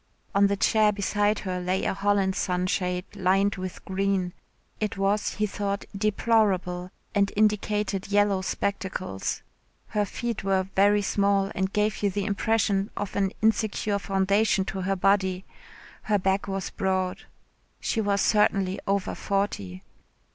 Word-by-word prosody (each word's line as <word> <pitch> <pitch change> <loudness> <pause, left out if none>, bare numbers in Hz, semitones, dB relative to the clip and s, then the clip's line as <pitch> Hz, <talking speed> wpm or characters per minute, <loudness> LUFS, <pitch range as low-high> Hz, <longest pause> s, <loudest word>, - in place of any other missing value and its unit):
On 200 0 +5
the 200 0 0
chair 215 +1 +4
beside 205 +1 +1
her 185 -1 -3
lay 185 +1 -1
a - - +1
Holland 195 -1 +1
sunshade 180 -1 -1
lined 195 +2 +2
with 185 -1 -6
green. 190 -2 0 0.5
It 210 -2 -2
was 200 +2 0
he 210 - +1
thought, 200 0 -3
deplorable, 195 -4 +1 0.2
and 200 -1 +2
indicated 210 -2 +1
yellow 205 -1 +2
spectacles. 190 - -3 0.5
Her 210 -1 0
feet 235 +2 -4
were 195 -1 +2
very 205 +1 +4
small 200 0 +1
and 190 0 -1
gave 210 0 0
you 205 - +2
the 200 +1 -2
impression 205 -1 +1
of 205 -1 -4
an 195 -1 +1
insecure 215 -2 +1
foundation 195 +1 +2
to 190 - -3
her 195 +1 0
body. 190 -1 +1 0.6
Her 210 -1 +1
back 195 +1 0
was 195 -1 -3
broad. 185 -1 -1 0.5
She 225 - -1
was 200 -1 +1
certainly 195 -3 +2
over 195 -1 0
forty. 100 - -2
195 Hz, 140 wpm, -26 LUFS, 190-205 Hz, 0.6 s, On